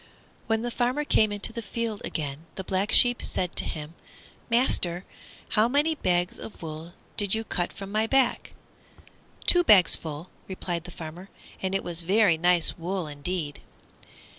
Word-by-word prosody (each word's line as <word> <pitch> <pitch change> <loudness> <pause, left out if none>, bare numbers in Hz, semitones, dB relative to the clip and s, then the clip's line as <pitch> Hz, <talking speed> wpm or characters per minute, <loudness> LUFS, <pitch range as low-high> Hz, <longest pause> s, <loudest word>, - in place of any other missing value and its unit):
When 225 0 0
the 240 - -3
farmer 250 +5 -1
came 215 -6 +3
into 205 +2 -3
the 230 - -5
field 225 0 -4
again 150 +1 -5
the 190 - -5
Black 190 +2 -1
Sheep 245 0 +7
said 180 -2 -1
to - - +3
him, 155 0 -5 0.6
"Master, 195 -7 +1 0.4
how 215 +2 +3
many 290 +5 +2
bags 180 - -1
of 210 - -10
wool 160 +2 -8 0.2
did 205 -1 +3
you 220 - -2
cut 180 -5 -1
from 195 0 -9
my 215 +1 +1
back?" 265 0 +1 0.9
"Two 355 0 +6
bags 195 - +6
full," 155 +2 -8 0.2
replied 175 -3 -5
the - - -9
farmer; 170 +3 -9 0.3
"and 190 0 -2
it 195 - -1
was 175 0 -3
very 195 +1 +3
nice 175 +1 +2
wool 180 +1 -3
indeed." 150 +1 -5
190 Hz, 165 wpm, -26 LUFS, 170-225 Hz, 0.9 s, Sheep